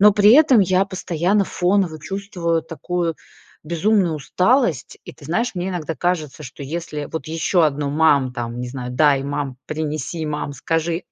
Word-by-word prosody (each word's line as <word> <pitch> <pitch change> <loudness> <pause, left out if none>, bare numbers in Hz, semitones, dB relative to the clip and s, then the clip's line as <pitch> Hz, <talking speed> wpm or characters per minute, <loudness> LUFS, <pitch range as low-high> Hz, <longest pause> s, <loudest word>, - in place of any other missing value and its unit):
Но 210 0 +7
при 205 +1 +6
этом 280 -3 +6
я 190 -1 +3
постоянно 185 +1 0
фоново 180 -4 0
чувствую 180 -2 -2
такую 165 +1 -3 0.5
безумную 175 +1 +1
усталость, 180 - +1
и, - - -9
ты - - -17
знаешь, 220 - -1
мне 180 +2 -2
иногда 165 -3 -4
кажется, 160 -4 -2
что 130 +2 -9
если 150 0 -5
вот 160 -3 -4
еще 165 +1 +2
одно: 145 -1 -2
"Мам!" 145 -4 +3
Там, 120 -1 -5
не 125 - -4
знаю: 125 -1 -6
"Дай, 140 0 +3
мам! 140 -2 -3
Принеси, 155 +1 -3
мам! 150 -1 -3
Скажи!"- 165 +4 -2
165 Hz, 160 wpm, -21 LUFS, 145-185 Hz, 0.5 s, Но